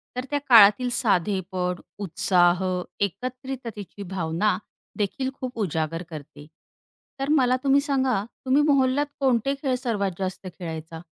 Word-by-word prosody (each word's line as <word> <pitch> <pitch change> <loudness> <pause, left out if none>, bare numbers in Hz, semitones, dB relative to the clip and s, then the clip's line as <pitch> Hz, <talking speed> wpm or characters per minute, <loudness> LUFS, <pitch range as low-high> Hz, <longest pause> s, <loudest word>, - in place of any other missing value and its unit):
तर 250 - -3
त्या 290 - +1
काळातील 225 +2 +7
साधेपण, 185 -5 0 0.2
उत्साह 185 -2 +2 0.4
एकत्रिततेची 245 -3 -7
भावना 185 +2 0 0.4
देखील 240 +6 -1
खूप 255 -2 -5
उजागर 165 -3 -2
करते. 150 -1 -10 0.7
तर 275 +1 -2
मला 255 -4 +4
तुम्ही 275 0 +4
सांगा 265 -7 +1 0.2
तुम्ही 270 +3 +4
मोहल्ल्यात 270 +1 +2
कोणते 265 -1 +2
खेळ 260 -3 +1
सर्वात 215 -6 -1
जास्त 190 0 -4
खेळायचा? 160 -1 -6
210 Hz, 120 wpm, -25 LUFS, 180-260 Hz, 0.7 s, काळातील